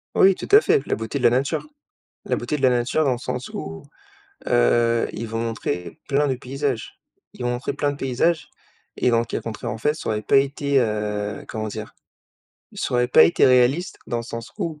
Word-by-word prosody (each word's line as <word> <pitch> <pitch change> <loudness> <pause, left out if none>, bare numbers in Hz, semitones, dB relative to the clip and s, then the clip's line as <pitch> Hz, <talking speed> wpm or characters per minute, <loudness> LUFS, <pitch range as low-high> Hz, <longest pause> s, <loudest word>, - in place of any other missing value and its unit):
Oui, 190 -1 +6
tout - - -7
à 420 - +10
fait, 440 -2 +2
la - - +1
beauté 110 +5 -4
de 125 - -6
la 120 - +7
nature. 130 +3 0 0.6
La - - 0
beauté 150 - -2
de 135 - -7
la 130 - +6
nature 125 +5 +1
dans 135 - +2
le 120 - -2
sens 125 0 -4
où, 80 0 -7 0.7
heu, 115 - +3
ils 115 - -5
vont 115 +1 -3
montrer 105 -7 -4
plein 145 +1 +2
de 130 - 0
paysages. 130 -3 -4 0.3
Ils - - -12
vont 120 - 0
montrer 125 +3 -3
plein 145 0 0
de - - -6
paysages 140 +6 0 0.5
et 125 - +1
dans 115 - +3
le 115 - -1
cas - - -4
contraire, 115 +1 -5
en 110 - -6
fait, 150 +6 +1
ça - - -7
aurait 105 -1 -1
pas 120 - +3
été, 140 0 +2
heu, 105 -2 -2
comment 110 -1 -4
dire? 110 0 -7 0.8
Ça - - -3
aurait 125 0 +2
pas - - +7
été 170 - +3
réaliste 130 +7 +3
dans 120 - -2
le 115 - -4
sens 115 0 -7
où 160 -3 -3
125 Hz, 220 wpm, -23 LUFS, 110-140 Hz, 0.8 s, à